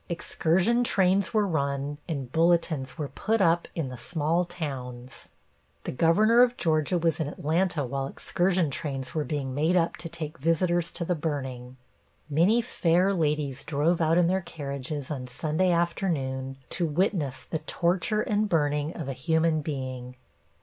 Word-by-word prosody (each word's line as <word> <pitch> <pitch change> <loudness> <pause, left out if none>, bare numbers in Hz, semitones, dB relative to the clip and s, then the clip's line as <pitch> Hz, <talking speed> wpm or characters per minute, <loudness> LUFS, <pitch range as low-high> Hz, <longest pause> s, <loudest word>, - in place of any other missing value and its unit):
Excursion 180 +7 +1
trains 195 -3 +2
were 215 -2 +2
run 140 -4 -2
and 135 -6 -4
bulletins 165 -5 +1
were 150 -3 -3
put 225 +2 -1
up 170 -2 +3
in 155 -6 -2
the 125 -1 -8
small 160 +5 0
towns. 130 -7 -7 0.5
The - - -3
Governor 215 - +4
of 245 0 +4
Georgia 160 +1 +1
was 165 -2 +1
in 160 - -1
Atlanta 160 +1 0
while 135 +2 -3
excursion 175 +1 0
trains 135 -3 -4
were 155 - 0
being 140 -4 -3
made 155 +6 +2
up 170 -2 +1
to 165 - -6
take 160 0 -6
visitors 170 +3 +1
to 170 - -4
the 180 - +1
burning. 130 -6 -4 0.5
Many 190 +11 +4
fair 180 0 +2
ladies 150 -5 -1
drove 165 +3 +1
out 165 +1 +3
in 175 - +5
their 190 +2 +1
carriages 140 -3 -5
on 130 -4 -4
Sunday 155 +8 0
afternoon 145 -7 -1
to 175 -2 0
witness 155 -5 0
the 160 - -4
torture 175 +6 0
and 210 0 0
burning 150 -2 0
of 160 - -5
a 135 - -2
human 160 +3 +1
being. 130 -4 -5
160 Hz, 155 wpm, -27 LUFS, 140-175 Hz, 0.5 s, in